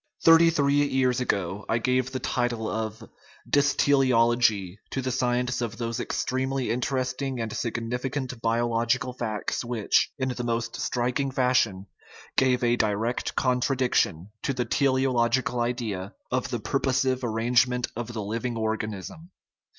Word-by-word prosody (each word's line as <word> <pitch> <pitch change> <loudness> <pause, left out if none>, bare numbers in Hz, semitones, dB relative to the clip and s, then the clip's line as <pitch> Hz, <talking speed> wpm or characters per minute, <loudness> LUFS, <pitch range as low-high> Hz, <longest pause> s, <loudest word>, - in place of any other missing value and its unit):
Thirty 165 0 +7
three 145 -3 +2
years 130 -1 +1
ago 100 -3 -1
I 115 - +2
gave 125 +2 +1
the 130 - -2
title 120 -3 -1
of 110 0 -4 0.4
"dystele 140 -1 +3
ology" 115 -5 +2
to - - -3
the 130 0 -2
science 125 -1 0
of 115 -1 -3
those 115 -1 -3
extremely 130 -2 -1
interesting 130 +1 -2
and 115 -1 -3
significant 125 +2 -3
biological 120 +2 +1
facts, 110 -3 -3
which, 120 -3 +1
in 130 -1 -1
the 125 -1 -3
most 115 0 -2
striking 125 +3 0
fashion, 125 -7 +1 0.5
give 130 -1 +3
a 120 0 +3
direct 110 +3 -1
contradiction 125 - +1
to 135 - -1
the 125 -1 -1
tele 130 +2 +2
ological 125 0 +1
idea 115 -5 -3
" - - -43
of 130 0 -1
the 120 -2 -2
purposive 130 +1 0
arrangement 120 +2 +2
of 120 0 -4
the 110 -3 -4
liv 110 +4 -3
ing 120 -2 -2
organism." 110 - -4
125 Hz, 145 wpm, -26 LUFS, 115-130 Hz, 0.5 s, Thirty